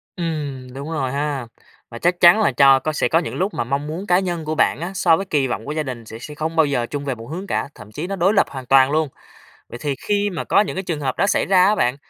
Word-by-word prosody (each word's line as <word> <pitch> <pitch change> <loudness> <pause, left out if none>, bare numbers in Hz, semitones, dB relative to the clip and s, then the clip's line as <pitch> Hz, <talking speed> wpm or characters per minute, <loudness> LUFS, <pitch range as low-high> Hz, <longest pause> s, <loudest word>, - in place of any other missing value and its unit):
Ừm, 145 -7 -4
đúng 140 +4 -7
rồi 135 -5 -2
ha. 140 -3 -2 0.4
Và 115 - -9
chắc 175 +4 +1
chắn 175 +5 +7
là 215 - +3
cho 135 -1 +6
có 155 +3 -3
sẽ - - +1
có 165 - +3
những 170 - -5
lúc 190 +3 -1
mà 120 - -1
mong 140 +4 -2
muốn 175 +6 -5
cá 180 -1 +4
nhân 175 -4 -3
của 155 +1 -2
bạn 155 - +2
á, 175 - -4
so 170 -3 +4
với 195 - -4
kỳ 145 -7 0
vọng 125 - -4
của 145 - -4
gia 155 0 -1
đình 125 -5 -7
sẽ 110 +1 -9
sẽ 150 +5 -9
không 160 +2 -3
bao 160 -2 +5
giờ 130 -4 -1
chung 140 +3 -5
về 135 -3 -2
một 115 0 -11
hướng 185 +4 -5
cả, - - -2
thậm 105 -2 -13
chí 155 +11 -5
nó 195 - -3
đối 190 +3 +2
lập 200 - +4
hoàn 130 -2 -8
toàn 135 +1 +5
luôn. 155 -1 +1 0.6
Vậy 120 - -8
thì 145 -2 -1
khi 205 0 +1
mà 180 - -4
có - - +3
những 210 - -3
cái 190 - -3
trường 165 -5 -3
hợp 130 -2 -2
đó 200 - +2
xảy - - +1
ra 185 -1 +5
á 210 - +3
bạn, 125 -9 +1
150 Hz, 305 wpm, -21 LUFS, 135-175 Hz, 0.6 s, chắn